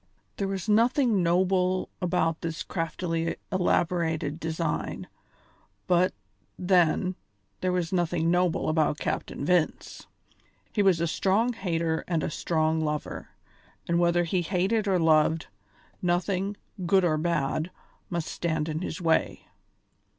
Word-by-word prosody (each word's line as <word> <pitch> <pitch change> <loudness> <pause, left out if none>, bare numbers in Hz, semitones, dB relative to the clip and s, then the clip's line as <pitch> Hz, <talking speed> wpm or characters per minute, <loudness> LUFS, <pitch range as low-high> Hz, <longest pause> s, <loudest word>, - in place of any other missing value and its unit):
There 195 - -1
was 195 +1 -4
nothing 230 0 +3
noble 185 +1 +2
about 165 -2 0
this 165 0 -3
craftily 165 0 -2 0.2
elaborated 170 -4 0
design; 160 -1 -3 0.8
but, 180 +1 +3 0.5
then, 180 0 +2 0.5
there 185 - 0
was 180 -1 -1
nothing 170 -2 +1
noble 175 -1 +1
about 155 -1 +2
Captain 140 - -3
Vince. 175 -1 0 0.7
He 210 - +2
was 190 -4 +4
a - - +2
strong 200 +8 +1
hater 165 -6 -1
and 165 -3 0
a - - -2
strong 160 0 0
lover, 150 -1 -4 0.6
and 170 0 +2
whether 175 0 +3
he 175 +2 0
hated 195 +5 0
or 190 -2 +3
loved, 160 -1 +3 0.6
nothing, 185 +3 0 0.3
good 190 +1 +4
or 155 -3 +1
bad, 155 0 0 0.4
must 170 -3 -2
stand 160 -2 -2
in 155 +1 -3
his 180 0 -4
way. 165 -1 +1
175 Hz, 125 wpm, -27 LUFS, 160-185 Hz, 0.8 s, was